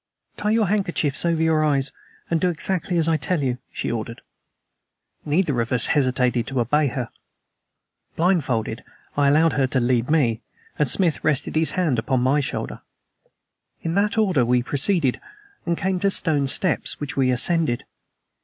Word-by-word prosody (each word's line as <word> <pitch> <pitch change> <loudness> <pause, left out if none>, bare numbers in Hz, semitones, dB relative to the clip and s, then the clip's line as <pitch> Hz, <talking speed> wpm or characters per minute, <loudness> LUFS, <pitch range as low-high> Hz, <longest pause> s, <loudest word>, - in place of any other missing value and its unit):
"Tie 210 - -2
your 220 0 +3
handkerchiefs 175 -7 0
over 165 -1 +1
your 160 -1 +2
eyes 140 -2 +1 0.4
and 165 -2 0
do 180 - +2
exactly 175 +1 -1
as 165 -1 +2
I 165 -1 +2
tell 155 +2 -1
you," 125 -1 -1
she - - -3
ordered. 115 0 -5 1.0
Neither 150 -5 +1
of 115 - -4
us 125 -3 +4
hesitated 125 -4 +1
to 135 -2 -2
obey 145 +6 +2
her. 125 -2 -4 1.1
Blind 175 -1 +2
folded, 115 -2 -3 0.3
I 145 -1 +3
allowed 155 +3 +4
her 135 -2 +1
to 130 - 0
lead 125 0 +1
me, 125 -8 +2 0.4
and 150 -3 +2
Smith 170 -1 +1
rested 150 -1 0
his 160 0 +2
hand 160 -10 +1
upon 125 +3 0
my 130 +4 +2
shoulder. 140 - -4 1.0
In 165 - -2
that 205 +3 +1
order 190 - +3
we 125 +1 +2
proceeded, 145 0 +1 0.5
and 170 -1 0
came 190 -1 -1
to 200 - +2
stone 150 -7 +1
steps, 170 +5 +1
which 145 -2 -5
we 130 -2 +2
ascended. 130 0 0
150 Hz, 165 wpm, -22 LUFS, 130-170 Hz, 1.1 s, us